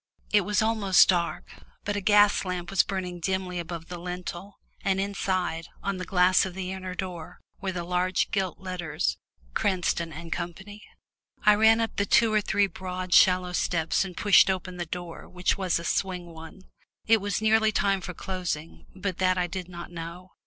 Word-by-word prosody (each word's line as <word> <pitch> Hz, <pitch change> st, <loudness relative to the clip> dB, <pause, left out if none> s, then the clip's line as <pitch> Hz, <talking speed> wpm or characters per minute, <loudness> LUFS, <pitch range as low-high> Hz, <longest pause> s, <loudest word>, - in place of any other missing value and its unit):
It 210 Hz, -, +5 dB
was 210 Hz, +2 st, +1 dB
almost 215 Hz, -4 st, +4 dB
dark, 175 Hz, -2 st, 0 dB, 0.3 s
but 205 Hz, -, -1 dB
a 205 Hz, -, -1 dB
gas 205 Hz, +1 st, +5 dB
lamp 180 Hz, -2 st, -4 dB
was 195 Hz, -, +5 dB
burning 180 Hz, -2 st, -4 dB
dimly 185 Hz, 0 st, -2 dB
above 170 Hz, -1 st, -6 dB
the 175 Hz, -1 st, -7 dB
lintel, 180 Hz, +2 st, -6 dB, 0.3 s
and 195 Hz, -2 st, +1 dB
inside, 185 Hz, -4 st, -2 dB, 0.2 s
on 195 Hz, -1 st, -2 dB
the 185 Hz, -, -5 dB
glass 180 Hz, 0 st, +4 dB
of 185 Hz, -2 st, -5 dB
the 185 Hz, -1 st, -4 dB
inner 185 Hz, -1 st, -6 dB
door, 180 Hz, -4 st, -6 dB, 0.2 s
were 190 Hz, -1 st, -2 dB
the 175 Hz, -1 st, -4 dB
large 180 Hz, +1 st, 0 dB
gilt 190 Hz, -3 st, -1 dB
letters 180 Hz, -, -3 dB, 0.3 s
"Cranston 175 Hz, -, 0 dB
and 165 Hz, +1 st, -5 dB
Co." 175 Hz, -, -3 dB, 0.9 s
I 210 Hz, -, +8 dB
ran 220 Hz, +2 st, +5 dB
up 225 Hz, -1 st, -2 dB
the 200 Hz, -, +1 dB
two 225 Hz, -2 st, +4 dB
or 215 Hz, -, +3 dB
three 205 Hz, 0 st, +2 dB
broad 185 Hz, -1 st, -5 dB
shallow 180 Hz, -1 st, +5 dB
steps 165 Hz, -1 st, +1 dB
and 185 Hz, -2 st, -8 dB
pushed 205 Hz, -1 st, +6 dB
open 185 Hz, -1 st, -3 dB
the 175 Hz, -1 st, -4 dB
door, 175 Hz, 0 st, -7 dB
which 180 Hz, 0 st, 0 dB
was 185 Hz, -3 st, 0 dB
a 170 Hz, -, -6 dB
swing 180 Hz, 0 st, -1 dB
one. 160 Hz, +4 st, -11 dB, 0.4 s
It 225 Hz, -1 st, +4 dB
was 200 Hz, -2 st, -1 dB
nearly 220 Hz, 0 st, +3 dB
time 195 Hz, -2 st, +1 dB
for 180 Hz, -1 st, -7 dB
closing, 180 Hz, -5 st, -5 dB
but 190 Hz, -1 st, -4 dB
that 185 Hz, 0 st, +2 dB
I 180 Hz, -, +1 dB
did 180 Hz, 0 st, -6 dB
not 175 Hz, -1 st, -9 dB
know. 170 Hz, +2 st, -8 dB
185 Hz, 185 wpm, -27 LUFS, 175-195 Hz, 0.9 s, I